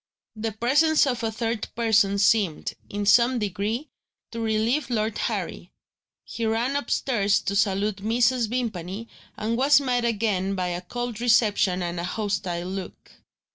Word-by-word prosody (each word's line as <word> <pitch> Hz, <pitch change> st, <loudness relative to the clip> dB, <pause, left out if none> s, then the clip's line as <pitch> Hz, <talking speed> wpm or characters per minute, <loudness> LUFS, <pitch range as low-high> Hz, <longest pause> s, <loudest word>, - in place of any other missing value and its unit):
The 220 Hz, +1 st, -3 dB
presence 290 Hz, +9 st, +3 dB
of 250 Hz, -3 st, -1 dB
a 225 Hz, -1 st, -1 dB
third 225 Hz, -1 st, -3 dB
person 220 Hz, -3 st, +3 dB
seemed, 200 Hz, -5 st, +2 dB, 0.2 s
in 205 Hz, 0 st, -3 dB
some 240 Hz, +4 st, +5 dB
degree, 210 Hz, -, -3 dB, 0.4 s
to 230 Hz, -, -6 dB
relieve 230 Hz, +5 st, 0 dB
Lord 220 Hz, -2 st, -1 dB
Harry. -, -, -4 dB, 0.5 s
He 230 Hz, -, -6 dB
ran 230 Hz, +5 st, 0 dB
upstairs 220 Hz, -7 st, +1 dB
to 200 Hz, -, -2 dB
salute 200 Hz, 0 st, +1 dB
Mrs. 235 Hz, +3 st, +1 dB
Vimpany, 215 Hz, -3 st, -4 dB, 0.3 s
and 220 Hz, +2 st, -1 dB
was 280 Hz, +3 st, +5 dB
met 250 Hz, -3 st, 0 dB
again 205 Hz, -4 st, 0 dB
by 180 Hz, -1 st, -1 dB
a 175 Hz, 0 st, -3 dB
cold 240 Hz, +3 st, -5 dB
reception 210 Hz, -6 st, +3 dB
and 175 Hz, 0 st, -3 dB
a -, -, -3 dB
hostile 190 Hz, -3 st, -2 dB
look. 190 Hz, 0 st, -7 dB
220 Hz, 145 wpm, -25 LUFS, 200-240 Hz, 0.5 s, some